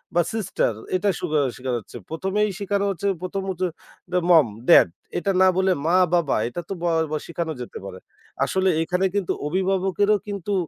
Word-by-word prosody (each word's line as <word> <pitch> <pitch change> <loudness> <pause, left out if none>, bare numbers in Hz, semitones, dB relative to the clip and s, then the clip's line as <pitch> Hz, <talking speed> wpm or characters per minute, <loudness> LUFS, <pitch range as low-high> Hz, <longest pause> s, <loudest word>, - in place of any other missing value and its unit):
বা 175 - +5
sister, 210 - 0 0.2
এটা 195 +2 +1
শুখা 155 -4 0 0.2
শিখা 130 0 -4
হচ্ছে। 115 +1 -9
১ম 175 +4 -3
এই 210 - +1
শিখানো 200 0 0
হচ্ছে 195 +1 -3
১ম 190 +2 -3
হচ্ছে 185 0 -1 0.4
দা 180 - +2
mom, 160 -7 +7 0.2
dad - - +8 0.3
এটা 185 +3 0
না 190 - +7
বলে 190 0 +3
মা, 170 +2 +3 0.2
বাবা 170 -5 +1
এটা 125 +9 -5
তো - - -2
ব - - -6 0.3
বা 155 - 0
শিখানো 170 -1 -3
যেতে 120 - -7
পারে। 95 -1 -8 0.5
আসলে 190 0 +1
এখানে 180 +3 0
কিন্তু 200 -4 0
অভিভাবকেরও 190 +4 +1
কিন্তু 200 -1 -3
185 Hz, 180 wpm, -23 LUFS, 165-195 Hz, 0.5 s, dad